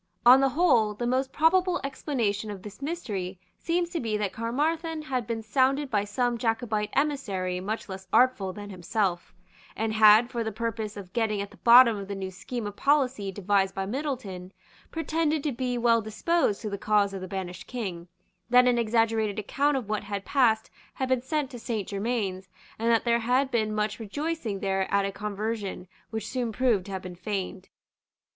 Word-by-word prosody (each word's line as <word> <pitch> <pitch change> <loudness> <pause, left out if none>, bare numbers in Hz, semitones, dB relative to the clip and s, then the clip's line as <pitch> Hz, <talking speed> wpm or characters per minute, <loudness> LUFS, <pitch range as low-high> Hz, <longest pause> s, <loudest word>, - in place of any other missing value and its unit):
On 255 +2 +9
the 270 - +4
whole, 250 -9 +3
the 240 - -3
most 260 +2 0
probable 355 +4 +3
explanation 235 -7 -2
of 200 -3 -7
this 210 +4 -10
mystery 205 - -4 0.2
seems 345 0 -1
to 340 - -2
be 220 -5 -1
that 205 -2 -2
Caermarthen 310 +7 -1
had 255 -7 -2
been 225 -1 -3
sounded 265 +5 +1
by 205 -2 +1
some 240 +3 -1
Jacobite 225 -2 -1
emissary 205 -11 -1
much 210 +4 -4
less 190 -1 -8
artful 245 -7 +3
than 205 +1 -8
himself, 185 0 -2 0.4
and 220 0 -1
had, 220 +2 +6
for 235 -2 -2
the 220 - -3
purpose 220 -1 -4
of 185 -3 -9
getting 220 -3 0
at 200 0 -4
the - - -16
bottom 235 -2 +7
of 200 -1 -6
the 200 - -4
new 190 -1 -5
scheme 225 +5 -5
of 205 -1 -5
policy 260 -8 +1
devised 195 0 +1
by 195 - -2
Middleton, 210 -7 -4 0.4
pretended 320 -2 -1
to 295 - 0
be 250 0 -2
well 230 -1 +3
disposed 220 +3 0
to 215 - -2
the 200 - -4
cause 205 -2 +2
of 190 - -5
the 185 - -5
banished 185 -1 -6
King, 190 -9 -5 0.4
that 250 +1 +6
an 245 -1 +3
exaggerated 225 -2 +1
account 275 +7 +1
of 245 -6 -4
what 210 -1 -2
had 200 -1 -4
passed 225 -5 +2 0.2
had 260 -1 -2
been 260 -2 +2
sent 290 +1 -2
to 245 - -8
Saint 220 -4 -3
Germains, 200 -3 -2 0.3
and 230 +1 +1
that 230 -1 +3
there 235 -1 +2
had 255 +4 +1
been 220 -3 +1
much 210 0 -1
rejoicing 230 -2 -3
there 195 -1 -1
at 200 0 +3
a 195 - -2
conversion 205 -1 -4 0.2
which 220 -1 -4
soon 245 -1 -2
proved 220 -5 +1
to - - -7
have 190 -1 -4
been 180 -1 -7
feigned. 190 0 -5
220 Hz, 190 wpm, -27 LUFS, 200-255 Hz, 0.4 s, On